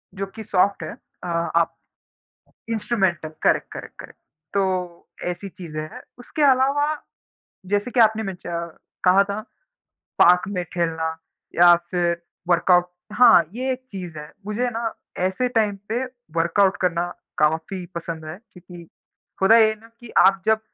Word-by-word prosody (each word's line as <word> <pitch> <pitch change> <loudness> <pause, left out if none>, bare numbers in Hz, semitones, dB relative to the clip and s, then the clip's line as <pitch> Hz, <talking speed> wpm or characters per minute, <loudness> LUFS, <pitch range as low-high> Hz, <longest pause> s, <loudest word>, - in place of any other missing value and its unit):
जो 195 +1 -3
कि 220 - -7
सॉफ्ट 200 +1 +1
है। - - -5 0.3
अ, - - -4
आप 170 0 0 0.9
इंस्ट्रूमेंटल, 195 -8 0
करेक्ट, - - +3
करेक्ट, - - -8
करेक्ट। - - -12 0.3
तो 185 -3 -1 0.2
ऐसी 195 +3 -7
चीज़ें 155 -4 -7
हैं। 155 - -9 0.2
उसके 295 +5 -5
अलावा 280 +4 +2 0.7
जैसे 205 +5 0
कि 240 - +2
आपने 220 0 +4
मेंश 190 -4 -7
अ, 170 -1 -3 0.4
कहा 185 +2 +6
था, 200 +2 -4 0.8
पार्क 180 +1 +7
में 180 -3 -2
खेलना 160 -2 -1 0.4
या 175 0 +8 0.2
फिर 170 -1 0 0.3
वर्कआउट, 180 +1 +4 0.3
हाँ, 230 -8 +7
ये 260 +3 -2
एक 255 - -3
चीज़ 180 -5 -7
है। 150 +1 -9
मुझे 240 +4 -1
ना 230 -1 -2 0.4
ऐसे 250 +7 -1
टाइम 215 -4 +1
पे 240 +3 0 0.3
वर्कआउट 190 +4 +3
करना 175 -1 +1 0.3
काफ़ी 160 +4 0
पसंद 165 -1 -5
है 155 +3 -7
क्योंकि 175 -2 -13 0.5
होता 220 +4 +7
ये 220 -1 +7
है 220 - -3
ना 225 - -16
कि 240 -2 -12
आप 195 +1 +5
जब 220 0 +3
185 Hz, 150 wpm, -23 LUFS, 170-220 Hz, 0.9 s, या